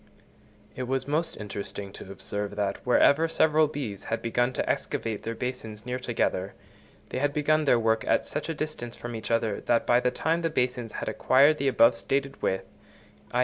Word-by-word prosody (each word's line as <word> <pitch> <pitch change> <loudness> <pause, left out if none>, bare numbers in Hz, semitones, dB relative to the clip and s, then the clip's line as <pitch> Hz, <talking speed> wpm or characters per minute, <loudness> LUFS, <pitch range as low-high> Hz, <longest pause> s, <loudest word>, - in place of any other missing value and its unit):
It 130 -1 -4
was 135 +1 -1
most 155 +3 -1
interesting 100 -1 -6
to 95 - -9
observe 105 +1 -5
that, 100 -1 -1
wherever 140 +5 +4
several 155 -1 +3
bees 130 -10 -5
had 115 - -1
begun 120 +2 +1
to - - -2
excavate 110 -3 -2
these 115 0 -4
basins 115 -4 -5
near 125 0 -3
together, 100 -6 -1 0.5
they - - -3
had 145 +1 +1
begun 155 +1 +2
their 125 - +5
work 115 -1 +1
at - - +2
such 150 - -4
a 165 - -2
distance 145 -6 -5
from 120 -1 -6
each 110 - -6
other 115 -3 0
that 120 - +3
by 120 - +4
the 125 - +2
time 160 +6 0
the 165 - 0
basins 125 -5 -1
had - - -4
acquired 140 +4 +4
the 140 - +1
above 115 -3 +5
stated 135 +8 -2
width 95 0 0 0.7
(_i. 125 - +1
125 Hz, 190 wpm, -27 LUFS, 110-145 Hz, 0.7 s, their